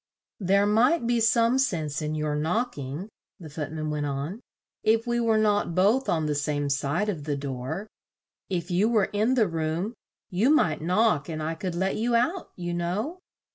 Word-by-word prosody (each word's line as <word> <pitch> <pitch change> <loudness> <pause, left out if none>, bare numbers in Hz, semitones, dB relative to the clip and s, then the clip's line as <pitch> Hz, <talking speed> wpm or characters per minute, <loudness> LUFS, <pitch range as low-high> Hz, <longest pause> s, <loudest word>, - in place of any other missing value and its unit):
"There 200 +1 +3
might 235 +7 +3
be 240 0 +2
some 230 +3 +3
sense 160 - 0
in 155 0 -2
your 150 -1 -1
knock 180 +12 0
ing," 140 +7 -5 0.3
the 160 -4 -10
Foot 150 -1 -5
man 155 -1 -3
went 150 -1 -1
on, 145 +9 -4 0.4
"if 225 +2 +2
we 240 0 0
were 225 -2 +3
not 205 -5 +1
both 210 +9 +3
on 160 -2 +1
the 150 - 0
same 145 0 -1
side 145 +8 0
of 165 -9 -3
the 145 -2 -1
door. 135 +7 -4 0.6
If 175 -1 -2
you 195 +6 +3
were 215 -4 +2
in 220 +5 +2
the 225 -5 +3
room, 165 +5 -2 0.4
you 200 +8 +2
might 165 - +3
knock 180 -3 +2
and 155 -1 -4
I 160 +1 -1
could 170 +1 -4
let 190 +2 0
you 235 +2 +1
out, 295 +11 0
you 175 -1 -4
know." 195 - -2
180 Hz, 190 wpm, -26 LUFS, 155-225 Hz, 0.6 s, There